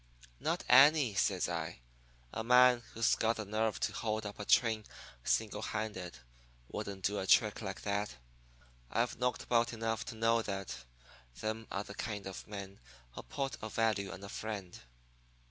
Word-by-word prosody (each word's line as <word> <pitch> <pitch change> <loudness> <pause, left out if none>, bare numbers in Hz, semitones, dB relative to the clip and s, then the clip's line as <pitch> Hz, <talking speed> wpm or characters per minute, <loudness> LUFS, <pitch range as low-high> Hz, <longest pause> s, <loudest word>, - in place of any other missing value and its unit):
"'Not - - -1
any,' 135 -1 +7
says 95 -2 +1
I. 85 -2 -3 0.6
'A 110 - -2
man 125 +1 +6
who's 115 0 +3
got 115 +1 +2
the 110 - -4
nerve 110 +2 0
to - - 0
hold 110 -1 -2
up 105 0 -6
a 105 - -4
train 110 -1 +4 0.4
single 110 -2 0
handed 100 - -4 0.5
wouldn't 95 -2 -4
do 100 +1 +1
a 95 - -3
trick 105 +2 +4
like 100 -3 -5
that. 100 0 -1 0.7
I've 120 - 0
knocked 125 -3 0
about 120 0 +2
enough 115 -1 -2
to 120 - -6
know 115 +1 +3
that 95 - -5 0.6
them 110 +1 -3
are 100 - -2
the 100 - -9
kind 105 -1 -4
of 95 -1 -7
men 100 -2 -7 0.3
who - - -8
put 135 - -3
a 110 - -4
value 110 -3 +1
on 95 0 -9
a 100 - -7
friend. 105 -4 -5
110 Hz, 165 wpm, -34 LUFS, 100-115 Hz, 0.7 s, any